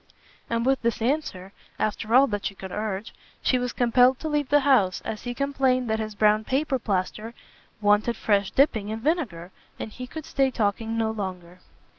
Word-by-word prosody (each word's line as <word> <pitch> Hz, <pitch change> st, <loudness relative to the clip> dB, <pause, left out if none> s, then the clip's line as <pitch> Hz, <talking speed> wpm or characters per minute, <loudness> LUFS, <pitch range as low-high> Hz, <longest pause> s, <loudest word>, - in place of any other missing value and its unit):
And 230 Hz, 0 st, 0 dB
with 265 Hz, 0 st, +2 dB
this 235 Hz, 0 st, 0 dB
answer, 225 Hz, -7 st, -2 dB, 0.2 s
after 215 Hz, +2 st, -1 dB
all 265 Hz, +2 st, +8 dB
that 205 Hz, -6 st, -2 dB
she 195 Hz, -, -7 dB
could 190 Hz, -1 st, -8 dB
urge, 210 Hz, 0 st, -4 dB, 0.3 s
she 255 Hz, -, +2 dB
was 250 Hz, 0 st, -2 dB
compelled 250 Hz, +1 st, +4 dB
to 315 Hz, -, -3 dB
leave 295 Hz, -3 st, -1 dB
the 290 Hz, 0 st, +5 dB
house, 250 Hz, -10 st, +3 dB
as 215 Hz, -, -5 dB
he 245 Hz, 0 st, -3 dB
complained 265 Hz, -2 st, +1 dB
that 220 Hz, -, 0 dB
his 215 Hz, -1 st, -4 dB
brown 215 Hz, +1 st, +3 dB
paper 270 Hz, +2 st, 0 dB
plaister 215 Hz, +2 st, -3 dB, 0.5 s
wanted 210 Hz, +3 st, +3 dB
fresh 200 Hz, -2 st, +1 dB
dipping 225 Hz, -7 st, +2 dB
in 220 Hz, +1 st, -4 dB
vinegar, 225 Hz, -, -1 dB, 0.3 s
and 220 Hz, -, -5 dB
he 250 Hz, +3 st, -8 dB
could 315 Hz, +4 st, -8 dB
stay 270 Hz, -1 st, +1 dB
talking 225 Hz, -1 st, -1 dB
no 220 Hz, -1 st, +1 dB
longer. 185 Hz, -4 st, -6 dB
225 Hz, 185 wpm, -25 LUFS, 205-260 Hz, 0.5 s, all